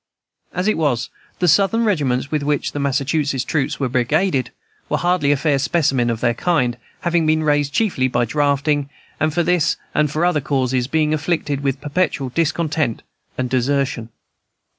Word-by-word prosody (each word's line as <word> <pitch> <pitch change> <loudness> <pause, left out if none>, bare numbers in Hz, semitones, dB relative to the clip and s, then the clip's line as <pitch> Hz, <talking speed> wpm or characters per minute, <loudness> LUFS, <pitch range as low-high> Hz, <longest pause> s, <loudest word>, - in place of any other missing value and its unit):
As 180 +3 -2
it 215 - +1
was, 135 -7 0 0.3
the 180 - +1
Southern 200 +7 +3
regiments 140 - 0
with 155 -2 0
which 145 -1 -1
the 145 - -4
Massachusetts 140 0 0
troops 140 -4 -1
were 135 - 0
brigaded 130 +4 +1 0.4
were - - +1
hardly 175 -5 +1
a 145 - +3
fair 140 0 +1
specimen 135 -4 +1
of 115 -1 -2
their 120 - +2
kind, 125 -4 0 0.2
having 170 -2 +1
been 155 0 +2
raised 145 -2 +1
chiefly 160 -8 +1
by 120 -1 +1
drafting, 145 +2 0 0.3
and, 155 +1 +1
for 170 +3 +1
this 175 -2 +2 0.2
and 150 0 +2
other 170 -2 +2
causes, 130 -3 0
being 155 +1 +1
afflicted 155 -2 -1
with 135 -1 -1
perpetual 150 -3 -1
discontent 155 -3 -1 0.3
and 130 - -1
desertion. 130 -2 0
145 Hz, 160 wpm, -20 LUFS, 130-160 Hz, 0.4 s, Southern